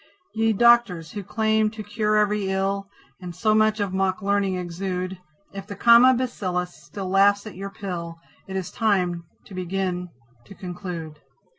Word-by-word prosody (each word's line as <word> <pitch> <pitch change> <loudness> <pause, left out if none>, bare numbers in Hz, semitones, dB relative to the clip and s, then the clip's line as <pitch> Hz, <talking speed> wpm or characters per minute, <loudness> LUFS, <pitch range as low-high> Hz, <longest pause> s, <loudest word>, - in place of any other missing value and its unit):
Ye 225 0 +2
Doctors, 220 -8 +4
who 205 - -5
claim 220 +1 +1
to 215 0 -8
cure 210 +1 0
every 210 -2 +1
ill, 195 +1 -1 0.3
And 175 -2 -7
so 215 +4 +2
much 215 0 +3
of 200 -2 -1
mock 190 +1 0
learning 200 -1 +1
exude, 180 +1 -4 0.4
If 195 0 -7
the 205 - -7
Comma 235 +5 +7
Bacillus 185 -8 -2
still 195 -2 -8
laughs 200 +2 +4
at 215 - -8
your 195 +2 -6
pill, 175 -4 -6 0.3
It 190 - -6
is 190 -3 -3
time 180 -6 0 0.2
to - - -13
begin 185 0 -3 0.4
to 195 - -13
conclude. 175 -4 -7
195 Hz, 160 wpm, -24 LUFS, 180-215 Hz, 0.4 s, Comma